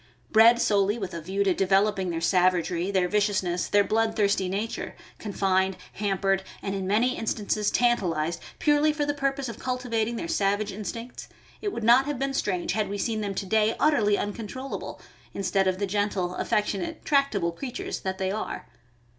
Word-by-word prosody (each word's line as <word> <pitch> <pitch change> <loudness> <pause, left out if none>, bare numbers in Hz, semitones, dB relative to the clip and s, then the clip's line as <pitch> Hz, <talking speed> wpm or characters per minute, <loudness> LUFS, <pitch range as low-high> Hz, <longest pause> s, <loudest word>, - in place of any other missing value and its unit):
Bred 230 +2 +7
solely 205 -1 +2
with 190 -5 -5
a 170 - -5
view 190 +5 -1
to 195 -2 +2
developing 195 0 +2
their 165 -1 -2
savagery, 180 0 +2
their 190 -2 +2
viciousness, 190 -3 0
their 205 0 +4
blood 220 +1 +1
thirsty 200 -3 +1
nature, 205 +4 -3 0.2
con 210 - -5
fined, 190 -1 +1 0.2
hampered, 195 -1 0 0.2
and 195 - -2
in 190 -1 -3
many 225 +6 +2
instances 210 -1 -1
tantalized, 175 -9 +1 0.2
purely 300 0 +3
for 295 -1 -1
the 290 - 0
purpose 275 -1 -1
of 230 - -7
cultivating 240 -3 -1
their 335 - -4
savage 205 -9 0
instincts, 230 +4 -7 0.3
it 410 - -2
would 235 - -5
not 240 +4 +6
have 290 -2 -2
been 275 +1 -2
strange 185 -9 -1
had 215 -3 -1
we 205 - -3
seen 220 +1 -1
them 200 -2 -3
to 195 - -3
day 220 +2 +2
utterly 215 -10 +3
uncontrollable, 230 +6 -5 0.4
instead 195 0 +1
of 185 0 +1
the 200 - -1
gentle, 200 -2 -1
affectionate, 210 - -2
tractable 275 - +2
creatures 250 +8 -5
that 190 0 -3
they 190 -1 -1
are. 215 +2 -4
205 Hz, 175 wpm, -26 LUFS, 190-235 Hz, 0.4 s, Bred